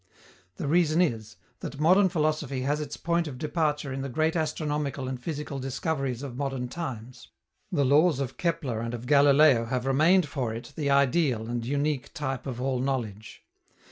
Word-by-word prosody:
The - - -4
reason 165 +1 +3
is, 110 -10 0 0.2
that 140 - -7
modern 185 +5 +5
philosophy 155 -5 -1
has 145 +3 0
its 150 - -6
point 170 0 0
of 135 -4 -7
departure 150 -1 -1
in 135 - -4
the 135 - -4
great 155 +6 0
astronomical 150 -4 -2
and 130 -1 -5
physical 150 -2 -4
discoveries 135 -1 -2
of 135 -4 -6
modern 135 -2 -3
times. 130 -7 -7 0.4
The 145 -6 +2
laws 150 +2 +4
of 135 -2 -3
Kepler 160 -9 -1
and 115 +1 -3
of 120 +1 -8
Galileo 140 -2 +5
have 125 +2 -2
remained 155 +6 +4
for 130 -6 -3
it 115 - -9
the 145 -3 -1
ideal 140 -4 +2
and 120 0 -3
unique 140 +1 -1
type 135 -5 -3
of 125 -2 -4
all 130 0 -1
knowledge. 115 -5 -4
140 Hz, 175 wpm, -27 LUFS, 125-155 Hz, 0.4 s, modern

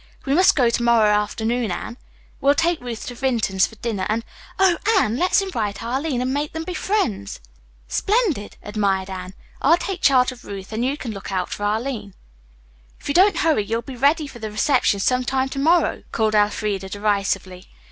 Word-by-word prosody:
We 275 - +1
must 365 +5 +5
go 245 -5 +3
to 235 - 0
morrow 230 -3 +4
afternoon, 220 +3 0
Anne. 185 +6 -5 0.4
We'll 280 +1 +3
take 335 +1 +1
Ruth 240 -3 -6
to 245 - -6
Vinton's 235 -7 +1
for 220 - -14
dinner 215 -4 -3
and, 225 +2 -1 0.3
oh, 380 -3 +4 0.2
Anne! 225 - +2
let's 365 +5 +3
invite 225 - -3
Arline 260 +2 -1
and 260 +1 -1
make 290 +1 -2
them 320 0 -4
be 365 - -5
friends!" 360 - -1 0.5
"Splendid!" 395 - 0
admired 195 -2 -1
Anne. 185 0 -7 0.3
"I'll 325 +5 +5
take 370 0 -4
charge 260 -2 +4
of 245 -1 -13
Ruth 195 +1 -8
and 225 +2 -1
you 270 +3 0
can 245 -6 -5
look 195 -2 -7
out 185 -2 -1
for 205 - -3
Arline." 215 -2 -2 0.8
"If - - -8
you - - +1
don't 385 +5 +5
hurry, 305 -10 +3
you'll 230 +3 -2
be 265 - -8
ready 290 +5 +2
for 265 -4 -10
the 215 -1 -5
reception 215 -1 +2
some 250 +5 +1
time 265 +1 0
to 275 - -5
morrow," 335 +5 +2
called 220 -1 +1
Elfreda 205 -2 0
derisively. 200 -3 -2
235 Hz, 190 wpm, -22 LUFS, 210-285 Hz, 0.8 s, must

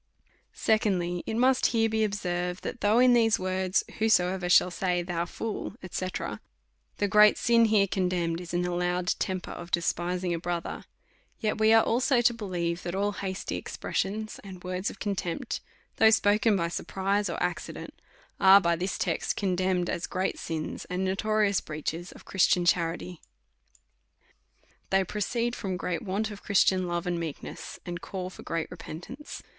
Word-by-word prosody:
Secondly, 180 -5 +1
It 220 - -2
must 255 +2 +4
here 225 -1 +2
be 220 0 +1
observed, 180 -3 -2
that 245 - -5
though 210 +2 +3
in 250 0 +6
these 225 -2 +4
words. 185 0 0 0.2
Whosoever 185 -4 +2
shall 180 0 +5
say. 180 -1 0
Thou 170 -1 -2
fool, 220 +1 -5 0.2
&c., 185 - -2 0.9
the 205 - +1
gTeat 210 +1 +6
sin 235 -1 +4
there 210 -2 +4
contemned 180 -3 -1
is 175 - -8
an 175 0 0
allowed 180 0 -1
temper 185 -1 -2
of 175 - -8
de 170 - +2
spising 175 +1 -1
a 170 - -2
brother; 170 0 -4 0.5
yet 215 -1 -1
we 220 0 +5
are 225 0 +7
also 245 +2 +2
to 240 0 +4
believe, 180 -6 -3
that 175 +1 -4
all 205 +1 +1
hasty 190 -2 -4
expressions, 215 +3 -3
and 185 -3 -10
words 185 +1 -2
of - - -10
contempt, 195 -4 -3 0.4
though 220 - +7
spoken 215 0 +4
by 170 -3 0
surprise 195 +4 -1
or - - -3
accident, - - -4 0.5
are 195 +1 +8
by 170 -3 +2
this 185 +3 -2
text - - -1
con 190 -3 0
demned 185 -1 +1
as 170 - -2
great 185 +1 -2
sins, 160 -2 -4
and 180 +1 -2
notorious 205 +1 +1
breaches 160 +3 -5
of - - -15
Christian 180 -2 +3
charity. 175 0 0 1.7
They 195 0 +3
proceed 230 +5 -2
from 190 -4 -3
g - - -7
reat 175 -2 -1
want 215 +1 -2
of 205 - -9
Christian 190 -2 +3
love 175 0 -2
and 175 -1 -1
meekness, 160 -4 -6
and 175 -1 -5
call 185 0 -5
for - - -11
great 165 -1 -3
repentance. 255 - -8
185 Hz, 165 wpm, -28 LUFS, 175-210 Hz, 1.7 s, are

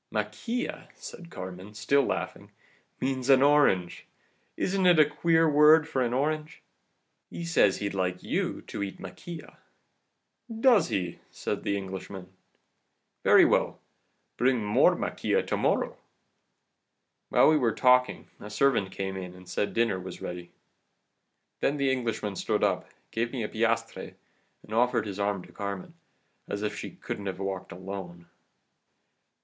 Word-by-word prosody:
"'Maquila,' 245 +1 -3
said 170 -1 -10
Carmen, 95 - -8
still 140 +7 +3
laughing, - - -3 0.5
'means 130 0 -2
an 135 0 +7
orange. 140 -12 +3 0.5
Isn't 190 -1 +1
it 175 -2 +6
a 155 - +7
queer 160 +2 +2
word 150 +1 +6
for 130 - -1
an 120 -2 +1
orange? 150 +4 -2 0.7
He 170 - -6
says 165 - +3
he'd 100 -1 -3
like 90 -1 -2
you - - -2
to - - -6
eat 100 -1 -4
maquila.' 125 - -9 0.9
"'Does 230 -1 +4
he?' 90 -3 -3
said - - -4
the 100 - -1
Englishman. 95 -1 -7 0.9
'Very - - +7
well, - - +1 0.6
bring 125 -3 +2
more 105 - +4
maquila - - -1
to - - -1
morrow.' - - 0 1.3
"While - - +5
we 155 - +5
were 120 -6 +2
talking 125 +1 +3
a 105 - -9
servant 105 -4 +2
came 95 0 -4
in 90 -1 -7
and 90 0 -14
said 100 +3 -1
dinner 115 -5 +1
was 90 0 -8
ready. 90 0 -6 1.1
Then 145 - +1
the 140 -1 +2
Englishman 115 -5 -2
stood - - -1
up, - - 0 0.2
gave 115 +1 -1
me 125 -4 -3
a - - -2
piastre, 115 +1 -1 0.5
and 110 - -10
offered 120 +1 +2
his 100 -1 -6
arm 100 -2 -1
to - - -15
Carmen, 100 - -6 0.6
as 100 +1 -3
if 105 -1 -2
she - - -6
couldn't 100 - -6
have 95 -2 -3
walked 95 -1 -4
alone. 90 -1 -8
110 Hz, 145 wpm, -28 LUFS, 95-140 Hz, 1.3 s, an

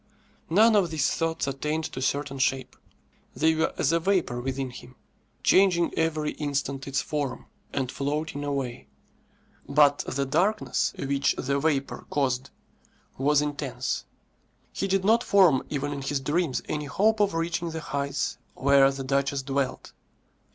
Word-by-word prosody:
None 215 +6 +5
of 195 -4 +3
these 155 -3 +1
thoughts 165 0 -1
attained 150 +4 -2
to 130 - -6
certain 135 +1 -1
shape. 130 0 0 0.6
They 160 +1 +3
were 160 +1 +1
as 145 - +2
a 170 - +3
vapour 170 -9 0
within 135 0 -3
him, 125 +1 -12 0.5
changing 180 -3 +4
every 155 -2 0
instant 140 -2 -3
its 135 0 -1
form, 145 -4 -3 0.3
and 130 -3 -2
floating 145 +1 -3
away. 135 -4 -3 0.8
But 145 0 +5
the 140 +1 -1
darkness 205 +8 +1
which 140 0 0
the 140 +2 0
vapour 140 -2 -1
caused 135 -1 0 0.7
was 145 +2 +3
intense. 145 -1 -3 0.7
He 195 - -2
did 195 0 +1
not 230 +3 +4
form 180 -10 +5
even 145 0 -2
in 140 - -5
his 140 +1 -1
dreams 150 +1 -1
any 150 -1 -3
hope 215 +9 +2
of 200 -4 +2
reaching 170 +1 -1
the 160 0 -4
heights 140 -1 -2 0.2
where 135 0 +5
the 135 0 -5
duchess 140 0 0
dwelt. 135 -1 -2
145 Hz, 145 wpm, -26 LUFS, 135-165 Hz, 0.8 s, None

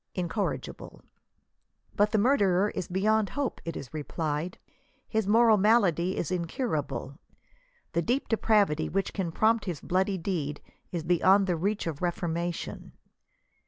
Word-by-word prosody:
INCORRIGIBLE. 185 +3 -4 0.9
But 205 +1 +3
the 220 - +2
murderer 205 -5 +3
is 175 - -4
beyond 210 +3 +1
hope, 285 -3 -3
it 165 - -4
is 130 - -9
replied. 155 +2 -3 0.5
His 220 -3 -1
moral 225 +1 +5
malady 190 -4 +3
is 175 - -2
incurable. 170 - -3 0.7
The 170 - +2
deep 245 - 0
depravity 205 -8 +2
which 195 +1 -1
can 185 -5 -2
prompt 220 +4 +2
his 175 -7 -3
bloody 190 +2 0
deed 165 -5 -3 0.3
is 170 -3 -3
beyond 185 +4 +4
the 180 -2 0
reach 200 +6 -1
of 160 -4 -4
reformation. 175 -1 -3
185 Hz, 130 wpm, -28 LUFS, 165-210 Hz, 0.9 s, moral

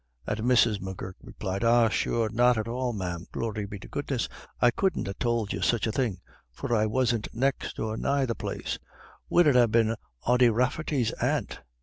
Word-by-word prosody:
And 105 - -2
Mrs. 115 -3 +3
M'Gurk 95 0 -6
replied, 95 +3 -4
"Ah, 115 0 +5
sure, 115 +1 0
not 120 +1 +4
at 110 +1 -2
all, 125 +1 -1
ma'am, 90 -5 -4
glory 105 -3 -3
be 100 - -7
to 95 - -11
goodness. 135 -4 -2 0.3
I 120 - +5
couldn't 190 - 0
ha' - - -2
tould 115 -4 0
you - - -4
such 120 -4 +2
a 110 - 0
thing, 110 -7 -1 0.3
for 90 - -4
I 110 0 +2
wasn't 115 -1 +1
next 135 +3 -1
or 110 0 -2
nigh 140 +2 +1
the 120 - -1
place. - - -4 0.5
Would 175 - +5
it 145 -4 +4
ha' 120 -2 +5
been 115 0 +3 0.3
Ody 125 0 +5
Rafferty's 125 +1 0
aunt? - - -1
115 Hz, 190 wpm, -27 LUFS, 105-125 Hz, 0.5 s, Ah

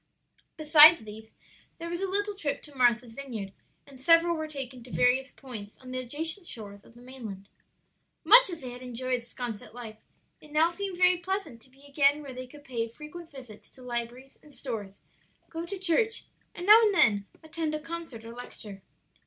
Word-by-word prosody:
Besides 310 +1 +8
these, 220 +1 -11 0.5
there 335 - -6
was 345 +2 -4
a 390 - -1
little 410 +2 -1
trip 300 -8 -4
to 295 - -11
Martha's 240 -2 +2
Vineyard, 225 -6 -7 0.3
and 270 -2 -15
several 335 +3 +5
were 315 -1 -4
taken 270 -4 -7
to 250 - -13
various 260 +2 +2
points 220 -6 -10
on 255 -1 -12
the 255 - -2
adjacent 320 +8 -1
shores 200 -3 -7
of 230 - -20
the 240 - -15
mainland. 220 -7 -8 0.7
Much - - +8
as 340 -3 -4
they 255 -2 -6
had 245 +1 -10
enjoyed 250 0 -3
'Sconset 230 -2 -6
life, 225 -3 -8 0.4
it 300 - -16
now 315 +3 +3
seemed 385 0 -5
very 360 0 +5
pleasant 370 - -4
to 260 - -19
be 270 +2 -19
again 285 +1 +2
where 275 -2 -8
they 255 0 -8
could 290 +3 -15
pay 235 -4 -3
frequent 300 +7 -11
visits 250 -7 -12
to 255 - -13
libraries 245 +2 -5
and 295 -2 -17
stores, 210 -7 -6 0.5
go 330 +1 -5
to 395 - -5
church, 385 +5 +2 0.3
and 355 - -6
now 430 +3 +9
and 420 -3 +3
then 205 - +3 0.2
attend 315 -1 -3
a - - -3
concert 325 -8 -8
or 230 - -9
lecture. 215 -4 -10
270 Hz, 190 wpm, -28 LUFS, 235-330 Hz, 0.7 s, now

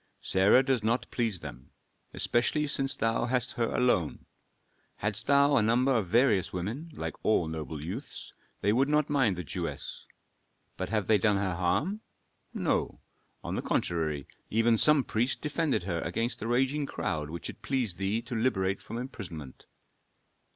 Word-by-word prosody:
Sarah 100 +7 +4
does 130 -3 +1
not 115 +3 +1
please 115 -7 -1
them, 65 -4 -9 0.4
especially 150 +5 +1
since 135 -2 +1
thou 115 +1 +1
hast 125 0 0
her 115 -1 -1
alone. 105 -11 +1 0.7
Hadst 105 +1 -2
thou 140 0 +5
a - - +5
number 125 +5 +3
of 105 -6 0
various 110 -2 +3
women, 110 - -4
like - - -4
all 100 -6 +2
noble 80 -1 -5
youths, 110 - -7 0.3
they 100 +1 +2
would 135 +4 +2
not 150 0 +2
mind 130 -9 +3
the 90 - -4
Jewess. - - -5 0.7
But 95 - -4
have 110 -3 0
they 105 +1 +4
done 105 0 +3
her 95 -2 -1
harm? 140 - 0 0.5
No. - - -1 0.4
On - - -4
the - - -1
contrary, 80 -5 -1 0.2
even 115 +1 +3
some 150 +4 +5
priest 120 +3 0
defended 150 - 0
her 85 -3 -2
against 115 +2 -2
a 110 - -3
raging 135 +4 +1
crowd 75 - -3
which 85 +2 -5
it - - -9
pleased 125 -10 -1
thee 100 +4 0
to 120 +1 -7
liberate 100 -5 0
from 115 - -7
imprisonment." 85 - -7
115 Hz, 160 wpm, -29 LUFS, 95-130 Hz, 0.7 s, thou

